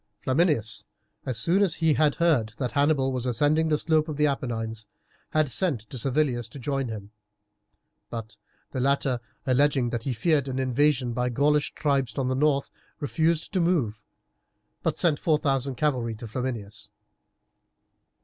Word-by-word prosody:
Flaminius, 130 - +1 0.4
as 125 -3 -1
soon 170 - +2
as 190 -5 +3
he 160 -1 +3
had 150 -1 +3
heard 140 -11 +2
that 125 -3 -2
Hannibal 140 -2 +2
was 125 0 -1
ascending 145 +6 +2
the 155 -1 +2
slopes 155 0 +1
of 150 - -4
the 150 - +3
Apennines, 115 -6 -2 0.4
had 155 -3 +1
sent 160 - 0
to 130 - -5
Servilius 125 -3 0
to 145 - -10
join 135 0 -2
him, 105 -2 -7 1.0
but 115 -1 -6 0.4
the 130 - -3
latter, 135 -1 +1 0.3
alleging 130 -1 +2
that 120 - -2
he 130 +2 -2
feared 140 +4 +1
an 130 -1 -3
invasion 130 -1 +1
by 125 +1 0
the 120 - -7
Gaulish 145 +2 +2
tribes 140 -4 0
on 130 -2 0
the - - +1
north, 140 0 +1 0.3
refused 160 +2 0
to 185 - +2
move, 135 -12 +1 0.8
but - - -1
sent 160 -4 +2
four 155 -2 +2
thousand 135 -3 0
cavalry 125 -5 0
to 115 +2 -8
Flaminius. 115 -3 -5
135 Hz, 160 wpm, -26 LUFS, 120-150 Hz, 1.0 s, as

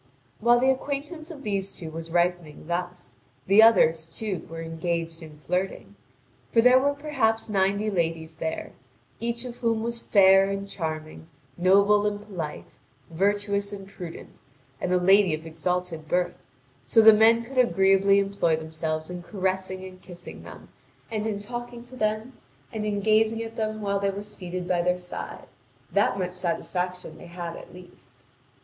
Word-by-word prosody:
While 240 +2 +5
the 260 +2 +4
acquaintance 290 +4 -4
of 295 -5 -9
these 200 -3 -2
two 160 -2 -7
was 165 +1 -6
ripening 175 -3 -1
thus, 175 -6 -4 0.3
the 200 +3 +6
others, 165 -8 +5
too, 185 +1 -5
were 165 0 -6
engaged 165 0 -3
in 155 -2 -11
flirting. 180 +6 -3 0.6
For 230 - +3
there 250 +2 +7
were 285 +2 +1
perhaps 270 -7 0
ninety 200 +1 +1
ladies 165 -3 -2
there, 160 0 -4 0.5
each 235 +1 -3
of 245 -1 -7
whom 230 -2 0
was 235 0 -2
fair 195 -2 +5
and 195 0 -3
charming, 160 -4 -5 0.3
noble 200 +4 +4
and 205 0 -2
polite, 180 -8 -7 0.3
virtuous 200 +3 0
and 195 -1 -8
prudent, 175 -4 -10 0.4
and 180 - -1
a 180 - +4
lady 190 -1 +5
of 160 +1 -10
exalted 165 0 -3
birth, 180 +1 +1 0.5
so 225 - +4
the 220 0 +10
men 225 +2 +5
could 255 +2 -3
agreeably 195 -3 +4
employ 195 -5 +1
themselves 155 +1 -4
in 180 0 -6
caressing 190 0 -3
and 185 0 -12
kissing 175 -1 -11
them, - - -12 0.4
and 215 -1 -2
in 205 -2 -2
talking 240 +2 -7
to 245 +1 -13
them 215 +2 -1 0.4
and 215 -1 -3
in 205 -1 -1
gazing 220 +2 +2
at 225 0 -8
them 215 -1 -2
while 200 0 0
they 200 0 +1
were 200 +1 -5
seated 185 -3 -6
by 180 -1 +1
their 180 +1 +1
side; 180 0 -8 0.5
that - - +2
much 180 -2 -2
satisfaction 180 +1 -3
they 175 - -11
had 170 -1 -6
at - - -11
least. 140 -9 -16
195 Hz, 165 wpm, -26 LUFS, 175-215 Hz, 0.6 s, the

